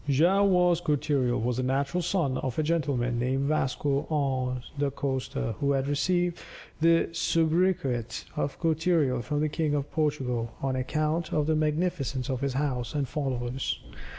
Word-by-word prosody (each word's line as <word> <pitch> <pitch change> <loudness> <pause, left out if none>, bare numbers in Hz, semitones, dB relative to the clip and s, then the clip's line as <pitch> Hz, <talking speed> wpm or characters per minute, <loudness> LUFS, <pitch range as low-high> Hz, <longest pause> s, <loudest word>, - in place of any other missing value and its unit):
Joao 180 +9 +4
Vaz 180 -2 +3
Cortereal 140 -5 +1
was 120 +1 -1
the - - +1
natural 140 +7 0
son 170 -7 0
of 130 -3 -3
a 155 - +2
gentleman 140 -7 0
named 130 +3 0
Vasco 145 0 0
Annes 130 -4 -1
da 145 -1 +2
Costa, 130 -4 -2
who 140 0 +2
had 135 0 0
received 175 +4 +1 0.4
the 165 +1 +4
soubriquet 160 -8 +1
of 140 - -2
Cortereal 160 -6 +2
from 145 +5 -2
the 155 - +1
King 150 -1 0
of 145 0 -2
Portugal, 130 -7 -1
on 135 -1 -1
account 155 +5 -1
of 150 - +1
the 160 +1 +2
magnificence 150 -4 0
of 130 -1 -2
his 140 -1 -1
house 130 -2 -2
and 140 -2 0
followers. 130 -3 -2
145 Hz, 155 wpm, -28 LUFS, 130-160 Hz, 0.4 s, Joao